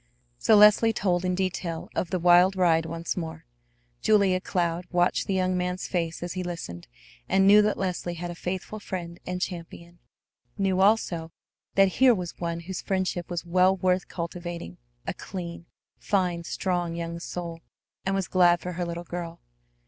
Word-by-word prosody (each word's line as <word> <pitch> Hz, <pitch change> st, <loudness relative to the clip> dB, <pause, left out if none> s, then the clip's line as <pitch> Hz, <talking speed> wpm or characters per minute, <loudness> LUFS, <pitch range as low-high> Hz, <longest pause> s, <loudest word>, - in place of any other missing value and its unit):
So 220 Hz, -, +5 dB
Leslie 210 Hz, +2 st, +6 dB
told 180 Hz, -4 st, 0 dB
in 180 Hz, 0 st, 0 dB
detail 180 Hz, -3 st, -3 dB
of 175 Hz, -, -2 dB
the 185 Hz, -, 0 dB
wild 180 Hz, +2 st, +5 dB
ride 165 Hz, -3 st, +3 dB
once 165 Hz, +1 st, -3 dB
more. 160 Hz, -2 st, -6 dB, 0.6 s
Julia 200 Hz, -4 st, +3 dB
Cloud 175 Hz, -1 st, -1 dB
watched 175 Hz, 0 st, +1 dB
the 195 Hz, -, 0 dB
young 185 Hz, 0 st, +1 dB
man's 180 Hz, 0 st, -2 dB
face 170 Hz, -2 st, -2 dB
as 175 Hz, -, -4 dB
he 185 Hz, -, -3 dB
listened, 165 Hz, -, -6 dB, 0.4 s
and 195 Hz, 0 st, +4 dB
knew 205 Hz, +2 st, +8 dB
that 210 Hz, 0 st, +1 dB
Leslie 180 Hz, -2 st, -2 dB
had 175 Hz, +1 st, -5 dB
a -, -, -5 dB
faithful 185 Hz, +5 st, -5 dB
friend 175 Hz, -4 st, -6 dB
and 180 Hz, 0 st, -2 dB
champion, 170 Hz, -1 st, -6 dB, 0.6 s
knew 190 Hz, -2 st, +1 dB
also 185 Hz, -6 st, +2 dB, 0.4 s
that 195 Hz, 0 st, +6 dB
here 255 Hz, -2 st, +7 dB
was 180 Hz, -3 st, -5 dB
one 170 Hz, -1 st, -3 dB
whose 185 Hz, +2 st, -5 dB
friendship 185 Hz, -3 st, -2 dB
was 175 Hz, -1 st, -3 dB
well 185 Hz, +2 st, +3 dB
worth 185 Hz, 0 st, +1 dB
cultivating, 170 Hz, -, -6 dB, 0.3 s
a -, -, -2 dB
clean, 170 Hz, -3 st, -7 dB, 0.3 s
fine, 180 Hz, -4 st, 0 dB
strong 175 Hz, -2 st, -1 dB
young 170 Hz, 0 st, -4 dB
soul, 170 Hz, -1 st, -6 dB, 0.4 s
and 195 Hz, 0 st, 0 dB
was 195 Hz, -3 st, -1 dB
glad 175 Hz, -2 st, +4 dB
for 180 Hz, -, -5 dB
her 175 Hz, 0 st, -3 dB
little 170 Hz, 0 st, -5 dB
girl. 170 Hz, -1 st, -6 dB
180 Hz, 170 wpm, -26 LUFS, 170-190 Hz, 0.6 s, knew